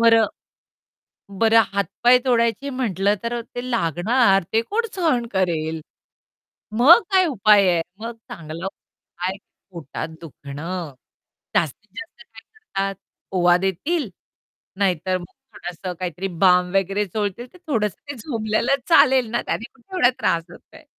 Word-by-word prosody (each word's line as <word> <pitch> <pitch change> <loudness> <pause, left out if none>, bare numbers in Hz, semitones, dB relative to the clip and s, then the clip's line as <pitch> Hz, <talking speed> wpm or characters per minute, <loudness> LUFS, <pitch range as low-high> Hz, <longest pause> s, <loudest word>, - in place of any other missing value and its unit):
बरं 225 -1 +5 1.1
बरं 225 0 +6
हात-पाय 200 +6 +3
तोडायची 235 +2 +1
म्हटलं 205 -6 0
तर 235 +1 -2
अ, - - -3
ते 245 +1 -5
लागणार 195 - +2
ते 225 - +4
कोण 455 - -1
सहन 295 -10 +1
करेल? 160 -4 -1 1.0
मग 315 - +8
काय 375 -1 +5
उपाय 210 - +4
आहे? 170 -1 +1 0.2
मग 230 +2 -5 0.2
चांगला 165 +1 -7
उपाय 180 -2 -8
आहे 190 - -6 0.3
पोटात 160 -3 -6
दुखणं. 155 +1 -7 0.6
जास्तीत 160 +8 -1
जास्त 230 +1 -10
काय 225 - -13
करतात 195 - -5 0.4
ओवा 175 -1 +5
देतील, 200 - -1 0.7
नाहीतर 185 -1 +1
मग 175 - -9 0.3
थोडंसं 175 +1 -6
काहीतरी 180 +1 -3 0.2
बाम 180 -1 +5
वगैरे 195 +2 +1
चोळतील 205 +4 -3
तर - - -14
थोडंसं 210 - -1
ते - - -4
झोपल्याला 230 +1 0
चालेल 260 -8 +5
ना, 240 - -1
त्याने - - -3
कुठे 265 +9 -16
एवढा 250 -9 +5
त्रास 165 -1 +1
होतोय. 315 - -16
205 Hz, 135 wpm, -22 LUFS, 180-240 Hz, 1.1 s, मग